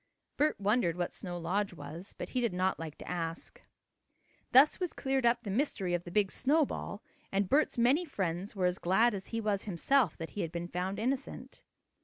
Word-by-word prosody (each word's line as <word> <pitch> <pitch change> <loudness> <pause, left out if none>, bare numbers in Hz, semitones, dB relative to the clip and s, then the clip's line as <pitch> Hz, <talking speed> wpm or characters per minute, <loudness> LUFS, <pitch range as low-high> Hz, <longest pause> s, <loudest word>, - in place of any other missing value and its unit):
Bert 300 -5 +1
wondered 200 -4 +2
what 175 -1 -2
Snow 175 -2 -5
Lodge 185 +3 -1
was, 155 +5 -9
but - - -5
he 255 - -1
did 235 -5 0
not 185 +1 0
like 160 -2 -6
to - - -11
ask. 165 -2 -4 0.9
Thus 270 +4 +7
was 360 -3 -2
cleared 265 -2 +1
up 235 0 +2
the 200 - -4
mystery 200 -6 0
of 175 0 -1
the 175 - -7
big 200 0 +2
snowball, 275 -6 0 0.3
and 195 0 +1
Bert's 295 +6 +2
many 255 +8 +4
friends 195 - -3
were 185 -2 0
as 180 +1 +1
glad 220 +7 +3
as 190 -1 -5
he 230 - -3
was 210 -3 -1
himself 210 - +2
that 165 - -6
he 205 - -3
had 165 - -3
been 170 0 -4
found 180 +2 -3
innocent. 260 +5 -3
200 Hz, 200 wpm, -32 LUFS, 175-245 Hz, 0.9 s, Thus